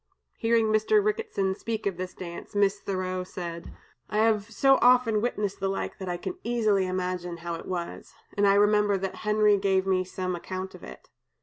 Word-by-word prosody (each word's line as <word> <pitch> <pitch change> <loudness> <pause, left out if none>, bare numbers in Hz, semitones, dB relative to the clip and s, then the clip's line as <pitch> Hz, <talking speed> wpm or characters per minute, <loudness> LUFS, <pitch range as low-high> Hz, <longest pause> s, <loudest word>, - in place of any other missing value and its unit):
Hearing 230 0 +3
Mr. 215 - +3
Ricketson 425 - 0
speak 220 +1 -4
of 200 -2 0
this 185 0 -5
dance, 170 +2 -8
Miss 200 0 +2
Thoreau 185 -2 -3
said: 170 -2 -7 0.4
"I 210 - -2
have 215 -1 +2
so 270 +4 +4
often 245 -4 +5
witnessed 210 -4 -2
the 195 - -1
like, 195 - -4
that 190 -2 -5
I 175 - -2
can 365 - -6
easily 215 -5 +1
imagine 180 -1 -3
how 170 - -2
it 165 - -7
was; 175 -2 -5 0.2
and 205 0 +3
I 195 - +5
remember 205 0 +4
that 190 0 -4
Henry 210 -1 +3
gave 190 -1 +2
me 185 -1 +2
some 185 0 -3
account 185 +2 -6
of - - -13
it. - - -12
200 Hz, 190 wpm, -27 LUFS, 185-215 Hz, 0.4 s, often